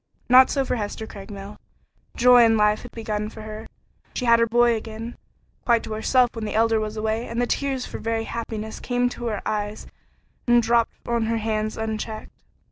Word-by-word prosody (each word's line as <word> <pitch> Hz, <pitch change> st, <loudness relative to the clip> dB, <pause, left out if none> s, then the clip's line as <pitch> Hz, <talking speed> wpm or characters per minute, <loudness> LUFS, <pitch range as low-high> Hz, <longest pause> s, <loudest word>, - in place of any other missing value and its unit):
Not 255 Hz, +1 st, +8 dB
so 275 Hz, -2 st, 0 dB
for 250 Hz, -, -1 dB
Hester 215 Hz, +1 st, -4 dB
Craigmile. 200 Hz, -1 st, -9 dB, 0.6 s
Joy 245 Hz, 0 st, +7 dB
and 225 Hz, -1 st, +4 dB
life 210 Hz, 0 st, +3 dB
had 245 Hz, -, -10 dB
begun 210 Hz, -2 st, -3 dB
for 220 Hz, 0 st, -10 dB
her. 215 Hz, +1 st, -8 dB, 0.5 s
She 250 Hz, -, -2 dB
had 235 Hz, -1 st, +5 dB
her 230 Hz, -, +3 dB
boy 240 Hz, +1 st, +4 dB
again 225 Hz, +1 st, -6 dB, 0.5 s
quite 235 Hz, -2 st, +3 dB
to 220 Hz, -, -5 dB
herself 240 Hz, +3 st, +2 dB
when 225 Hz, -, -6 dB
the 210 Hz, -, -4 dB
Elder 225 Hz, 0 st, +3 dB
was 215 Hz, 0 st, -4 dB
away, 220 Hz, +2 st, -1 dB
and 230 Hz, +1 st, -4 dB
the 245 Hz, -, +2 dB
tears 270 Hz, 0 st, -1 dB
for -, -, -7 dB
very 225 Hz, 0 st, -1 dB
happiness 220 Hz, -2 st, -5 dB
came 245 Hz, 0 st, 0 dB
to 240 Hz, -1 st, -6 dB
her 210 Hz, -3 st, -3 dB
eyes 210 Hz, 0 st, -3 dB, 0.6 s
and 240 Hz, 0 st, +5 dB
dropped 230 Hz, 0 st, 0 dB
on 235 Hz, -2 st, 0 dB
her 230 Hz, 0 st, 0 dB
hands 215 Hz, -1 st, -2 dB
unchecked. 220 Hz, 0 st, -4 dB
225 Hz, 195 wpm, -24 LUFS, 215-235 Hz, 0.6 s, Not